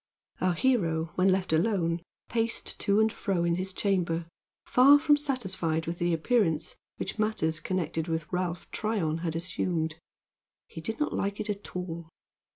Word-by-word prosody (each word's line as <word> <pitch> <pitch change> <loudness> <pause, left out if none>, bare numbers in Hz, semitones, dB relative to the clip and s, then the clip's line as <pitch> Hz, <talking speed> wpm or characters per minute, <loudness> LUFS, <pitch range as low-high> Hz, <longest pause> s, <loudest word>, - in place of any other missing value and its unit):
Our 185 -1 +3
hero, 165 -9 +1
when 185 +1 +3
left 185 -3 0
alone, 170 -1 +1 0.3
paced 230 0 -1
to 200 +1 +3
and 220 0 +3
fro 185 -4 -1
in 170 0 +2
his 185 +1 -1
chamber, 180 -4 0 0.4
far 275 +3 +7
from 295 0 +4
satisfied 190 - -1
with 170 +1 -4
the 175 0 +1
appearance 165 -2 +1 0.2
which - - -4
matters 160 -8 +1
connected 165 -1 -2
with 160 -1 -1
Ralph 180 -1 -2
Tryon 190 -8 -1
had 165 -1 -2
assumed. 165 -2 -1 0.7
He 165 - -9
did 225 +6 -4
not 300 - 0
like 200 +1 -1
it 215 0 -1
at 200 -2 -8
all. 170 -2 -5
180 Hz, 160 wpm, -29 LUFS, 165-215 Hz, 0.7 s, far